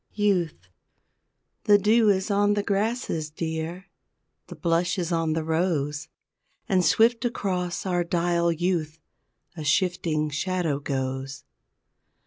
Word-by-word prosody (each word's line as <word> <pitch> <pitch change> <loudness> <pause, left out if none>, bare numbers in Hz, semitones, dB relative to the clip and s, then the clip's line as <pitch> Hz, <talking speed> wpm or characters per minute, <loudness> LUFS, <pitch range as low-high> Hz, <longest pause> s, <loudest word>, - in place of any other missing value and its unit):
YOUTH 180 - 0 1.0
The 205 -1 +7
dew 215 +2 +4
is 190 +1 +1
on 205 +1 +3
the 205 - 0
grasses, 200 -6 -1
dear, 160 +3 -4 0.6
The - - -9
blush 175 +1 0
is 175 -1 -2
on 165 -2 +1
the 160 0 -1
rose, 160 -3 -1 0.6
And 185 -2 +2
swift 230 +5 +3
across 185 -7 -2
our 175 -2 +1
dial 170 0 +1
youth, 165 -2 -1 0.6
A 160 - -6
shifting 155 -1 0
shadow 165 -1 -1
goes. 135 -1 -4
175 Hz, 115 wpm, -25 LUFS, 155-195 Hz, 1.0 s, The